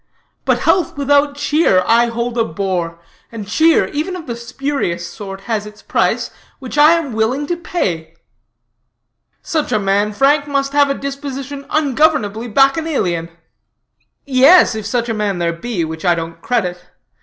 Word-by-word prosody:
But -, -, +1 dB
health 355 Hz, -6 st, +1 dB
without 285 Hz, 0 st, +2 dB
cheer 285 Hz, -, +2 dB
I 235 Hz, +3 st, +4 dB
hold 235 Hz, +1 st, -3 dB
a 230 Hz, -, +2 dB
bore; 175 Hz, -2 st, -3 dB, 0.3 s
and 220 Hz, -3 st, -7 dB
cheer, 315 Hz, +10 st, +3 dB
even 320 Hz, +5 st, -3 dB
of 345 Hz, -3 st, -8 dB
the 235 Hz, -, -4 dB
spurious 235 Hz, -7 st, -3 dB
sort, 195 Hz, +1 st, -8 dB
has 215 Hz, -1 st, -3 dB
its 210 Hz, 0 st, -14 dB
price, -, -, 0 dB, 0.3 s
which 260 Hz, -1 st, -8 dB
I 300 Hz, +2 st, +7 dB
am 325 Hz, -7 st, -1 dB
willing 230 Hz, +6 st, 0 dB
to 345 Hz, -, -2 dB
pay.'" 170 Hz, -, -3 dB, 1.3 s
"Such 310 Hz, -2 st, -2 dB
a -, -, +3 dB
man, 200 Hz, +1 st, +1 dB
Frank, 280 Hz, +6 st, +2 dB
must 275 Hz, -1 st, -1 dB
have 285 Hz, -1 st, +4 dB
a 275 Hz, -, 0 dB
disposition 275 Hz, 0 st, -6 dB
ungovernably 260 Hz, -7 st, +1 dB
bacchanalian." 270 Hz, -, +1 dB, 1.0 s
"Yes, 275 Hz, +4 st, +6 dB
if 215 Hz, -2 st, -5 dB
such 235 Hz, +1 st, -1 dB
a 225 Hz, -, -1 dB
man 210 Hz, -3 st, -1 dB
there 170 Hz, -1 st, 0 dB
be, 175 Hz, 0 st, -3 dB
which 160 Hz, 0 st, -7 dB
I 175 Hz, -2 st, +3 dB
don't 165 Hz, 0 st, -6 dB
credit. 180 Hz, -7 st, -2 dB
240 Hz, 155 wpm, -17 LUFS, 195-285 Hz, 1.3 s, I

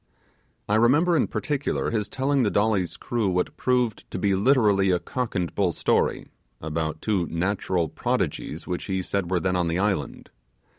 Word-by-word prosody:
I 105 Hz, -, +2 dB
remember 145 Hz, +10 st, +4 dB
in 145 Hz, -, +2 dB
particular 145 Hz, -1 st, -2 dB
his 105 Hz, -3 st, -1 dB
telling 135 Hz, +1 st, +1 dB
the 110 Hz, -, +2 dB
Dolly's 100 Hz, -5 st, +1 dB
crew 115 Hz, -5 st, -1 dB
what 90 Hz, 0 st, -1 dB
proved 125 Hz, -4 st, 0 dB
to -, -, -5 dB
be 100 Hz, +1 st, +1 dB
literally 100 Hz, -3 st, +3 dB
a 90 Hz, -, +3 dB
cock 125 Hz, +5 st, -4 dB
and 90 Hz, -3 st, -1 dB
bull 95 Hz, -4 st, +1 dB
story, -, -, 0 dB, 0.3 s
about 80 Hz, 0 st, -3 dB
two 95 Hz, -6 st, 0 dB
natural 90 Hz, -1 st, -1 dB
prodigies 80 Hz, +1 st, -2 dB
which 90 Hz, -1 st, -4 dB
he 95 Hz, -2 st, -2 dB
said 95 Hz, -2 st, -2 dB
were 90 Hz, -1 st, +1 dB
then 90 Hz, +1 st, 0 dB
on 90 Hz, -1 st, +1 dB
the 85 Hz, +1 st, 0 dB
island. 95 Hz, -6 st, -2 dB
100 Hz, 170 wpm, -25 LUFS, 90-115 Hz, 0.3 s, remember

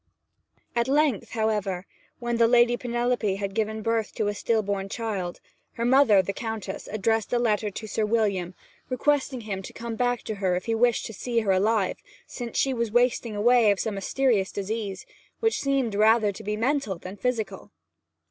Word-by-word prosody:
At 235 Hz, +1 st, +1 dB
length, 280 Hz, -4 st, +2 dB
however, 210 Hz, -5 st, -1 dB, 0.3 s
when 240 Hz, -1 st, -2 dB
the 230 Hz, 0 st, +5 dB
Lady 240 Hz, 0 st, +5 dB
Penelope 240 Hz, -4 st, 0 dB
had 195 Hz, 0 st, -4 dB
given 220 Hz, 0 st, -2 dB
birth 225 Hz, -1 st, -1 dB
to 210 Hz, -, 0 dB
a -, -, -1 dB
still 220 Hz, +1 st, 0 dB
born 195 Hz, -1 st, -2 dB
child, 195 Hz, -6 st, -3 dB, 0.3 s
her 235 Hz, -, -2 dB
mother, 245 Hz, -6 st, +5 dB
the 200 Hz, -, -3 dB
Countess, 220 Hz, -3 st, -5 dB
addressed 220 Hz, +1 st, 0 dB
a 245 Hz, -, +2 dB
letter 215 Hz, -3 st, +1 dB
to 210 Hz, +2 st, -7 dB
Sir 220 Hz, +1 st, -1 dB
William, 205 Hz, -5 st, 0 dB, 0.3 s
requesting 265 Hz, -1 st, 0 dB
him 200 Hz, -3 st, -4 dB
to -, -, -10 dB
come 230 Hz, -1 st, -5 dB
back 245 Hz, 0 st, 0 dB
to 220 Hz, -, -4 dB
her 185 Hz, -2 st, +2 dB
if 180 Hz, -, -3 dB
he 230 Hz, -, 0 dB
wished 235 Hz, +1 st, +2 dB
to 225 Hz, -, -6 dB
see 235 Hz, +3 st, -1 dB
her 205 Hz, -3 st, +1 dB
alive; 200 Hz, +1 st, +2 dB, 0.3 s
since 240 Hz, -2 st, -6 dB
she 270 Hz, -, +2 dB
was 235 Hz, -2 st, -1 dB
wasting 240 Hz, -2 st, +2 dB
away 235 Hz, +1 st, +5 dB
of 200 Hz, -2 st, +2 dB
some 220 Hz, -, -1 dB
mysterious 200 Hz, 0 st, +1 dB
disease, 200 Hz, -1 st, -4 dB, 0.3 s
which 450 Hz, -1 st, +1 dB
seemed 275 Hz, -4 st, +1 dB
to 200 Hz, -, -3 dB
be -, -, +4 dB
rather 220 Hz, -1 st, +4 dB, 0.2 s
mental 255 Hz, -3 st, 0 dB
than 185 Hz, +3 st, -8 dB
physical. 220 Hz, -4 st, -3 dB
220 Hz, 185 wpm, -26 LUFS, 200-240 Hz, 0.3 s, the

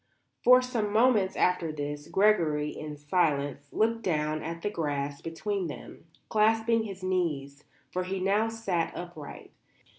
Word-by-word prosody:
For 250 Hz, +1 st, +7 dB
some 230 Hz, -5 st, -1 dB
moments 220 Hz, -3 st, +3 dB
after 180 Hz, -3 st, +1 dB
this 145 Hz, 0 st, -5 dB
Gregory, 165 Hz, -8 st, +2 dB
in 150 Hz, -1 st, -7 dB
silence, 145 Hz, -3 st, 0 dB
looked 230 Hz, +1 st, +1 dB
down 155 Hz, -5 st, 0 dB
at 165 Hz, 0 st, -6 dB
the -, -, 0 dB
grass 145 Hz, -5 st, -2 dB
between 185 Hz, +3 st, -3 dB
them, 150 Hz, -, -9 dB, 0.2 s
clasping 225 Hz, +1 st, +3 dB
his 195 Hz, -3 st, -8 dB
knees; 150 Hz, -7 st, -2 dB, 0.3 s
for 185 Hz, -, -1 dB
he 190 Hz, +1 st, -3 dB
now 205 Hz, +4 st, +2 dB
sat 200 Hz, -7 st, -2 dB
upright. 175 Hz, -4 st, -9 dB
180 Hz, 140 wpm, -29 LUFS, 150-210 Hz, 0.3 s, For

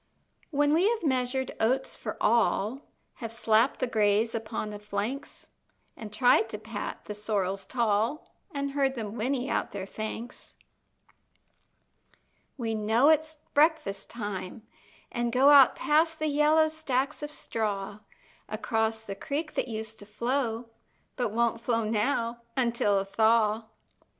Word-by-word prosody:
When 290 Hz, -1 st, +2 dB
we 360 Hz, +6 st, +4 dB
have 465 Hz, -4 st, -1 dB
measured 260 Hz, -2 st, 0 dB
oats 255 Hz, +4 st, +1 dB
for 215 Hz, -, -6 dB
all, 230 Hz, +2 st, +2 dB, 0.4 s
Have 230 Hz, -4 st, -6 dB
slapped 225 Hz, +2 st, +2 dB
the 255 Hz, -, +1 dB
grays 220 Hz, -1 st, +2 dB
upon 215 Hz, -1 st, -4 dB
the 205 Hz, -, -7 dB
flanks, 210 Hz, +6 st, -5 dB, 0.5 s
An' 220 Hz, -, -8 dB
tried 225 Hz, 0 st, +4 dB
to 210 Hz, -, -5 dB
pat 215 Hz, 0 st, -6 dB
the 210 Hz, -, -5 dB
sorrels 200 Hz, -2 st, -2 dB
tall, 230 Hz, +4 st, 0 dB, 0.2 s
An' 280 Hz, -2 st, -2 dB
heard 275 Hz, -1 st, 0 dB
them 215 Hz, -4 st, -5 dB
whinny 255 Hz, +3 st, -1 dB
out -, -, -1 dB
their 195 Hz, -2 st, -4 dB
thanks, 220 Hz, +4 st, -7 dB, 2.0 s
We 230 Hz, -3 st, -2 dB
know 220 Hz, +6 st, +3 dB
it's 315 Hz, 0 st, +2 dB, 0.2 s
breakfast 290 Hz, -11 st, +2 dB
time, 205 Hz, -1 st, -5 dB, 0.5 s
and 240 Hz, 0 st, -1 dB
go 260 Hz, +4 st, +5 dB
Out 275 Hz, -3 st, +8 dB
past 320 Hz, +2 st, +2 dB
the 310 Hz, 0 st, -1 dB
yellow 300 Hz, +2 st, +4 dB
stacks 295 Hz, -3 st, -2 dB
of 295 Hz, -, -4 dB
straw, 210 Hz, -6 st, -3 dB, 0.5 s
Across 220 Hz, 0 st, -1 dB
the 200 Hz, -, -5 dB
creek 300 Hz, +8 st, -3 dB
that -, -, -1 dB
used 220 Hz, -1 st, -5 dB
to 205 Hz, -, -10 dB
flow, 235 Hz, +1 st, -2 dB, 0.4 s
But 245 Hz, -3 st, 0 dB
won't 230 Hz, +1 st, 0 dB
flow 230 Hz, -1 st, +1 dB
now 230 Hz, +2 st, 0 dB, 0.2 s
until 235 Hz, -5 st, +2 dB
a 195 Hz, -, 0 dB
thaw. 220 Hz, +1 st, +2 dB
230 Hz, 140 wpm, -28 LUFS, 215-275 Hz, 2.0 s, Out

